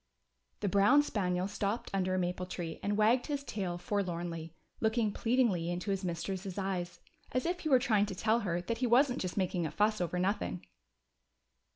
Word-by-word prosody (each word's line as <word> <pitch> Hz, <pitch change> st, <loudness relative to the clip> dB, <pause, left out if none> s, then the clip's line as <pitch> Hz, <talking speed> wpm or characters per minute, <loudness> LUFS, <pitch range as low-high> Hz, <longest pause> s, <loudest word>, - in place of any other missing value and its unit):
The 205 Hz, -, 0 dB
brown 205 Hz, +10 st, +5 dB
spaniel 185 Hz, -8 st, -1 dB
stopped 205 Hz, +2 st, -2 dB
under 185 Hz, -1 st, +1 dB
a -, -, 0 dB
maple 180 Hz, 0 st, -2 dB
tree 170 Hz, -3 st, -5 dB
and 205 Hz, +1 st, 0 dB
wagged 230 Hz, +4 st, +3 dB
his 285 Hz, -2 st, -2 dB
tail 190 Hz, -8 st, -3 dB
forlornly, 175 Hz, -3 st, -3 dB, 0.2 s
looking 220 Hz, -1 st, +1 dB
pleadingly 225 Hz, -8 st, +1 dB
into 180 Hz, +4 st, -2 dB
his 195 Hz, 0 st, -1 dB
mistress's 185 Hz, +2 st, -3 dB
eyes, 185 Hz, -3 st, -3 dB, 0.3 s
as 255 Hz, -, 0 dB
if 350 Hz, +1 st, -1 dB
he 315 Hz, -, -3 dB
were 265 Hz, -, +7 dB
trying 215 Hz, -5 st, +2 dB
to 195 Hz, -, -5 dB
tell 220 Hz, +4 st, +2 dB
her 175 Hz, -5 st, -1 dB
that 230 Hz, +5 st, -3 dB
he 250 Hz, -, +1 dB
wasn't 250 Hz, +2 st, +4 dB
just 185 Hz, +1 st, -4 dB
making 180 Hz, -3 st, 0 dB
a -, -, -4 dB
fuss 215 Hz, +2 st, +1 dB
over 175 Hz, 0 st, -1 dB
nothing. 95 Hz, -, -1 dB
195 Hz, 185 wpm, -32 LUFS, 180-225 Hz, 0.3 s, were